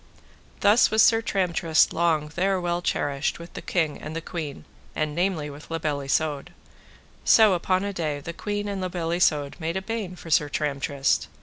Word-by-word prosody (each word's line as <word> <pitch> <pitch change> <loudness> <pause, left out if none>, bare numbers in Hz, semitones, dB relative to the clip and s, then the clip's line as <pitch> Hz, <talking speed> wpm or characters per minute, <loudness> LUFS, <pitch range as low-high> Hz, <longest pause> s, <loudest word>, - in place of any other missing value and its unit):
Thus 210 +4 +5
was 220 +1 +5
Sir 225 -1 +5
Tramtrist 180 -6 +2
long 160 -3 +1
there 190 +1 +1
well 175 0 -1
cherished 145 -4 -1
with 170 +1 -11
the - - -7
king 160 -5 -1
and 155 +2 -7
the - - -1
queen, 160 -4 -6 0.3
and 155 -1 -1
namely 175 -2 0
with 145 +2 -12
La 165 - -2
Beale 150 -3 -2
Isoud. 145 +3 -1 0.7
So 220 -3 +6
upon 185 +2 +1
a 200 0 -3
day 155 -5 -2
the 170 +4 -7
queen 205 +3 -3
and 200 -2 -3
La 185 - -1
Beale 175 -2 -3
Isoud 150 -5 +1
made 165 +2 -2
a - - -2
bain 215 -4 -4
for 165 -2 -10
Sir 150 -1 +3
Tramtrist. 140 -2 0
170 Hz, 190 wpm, -25 LUFS, 150-185 Hz, 0.7 s, So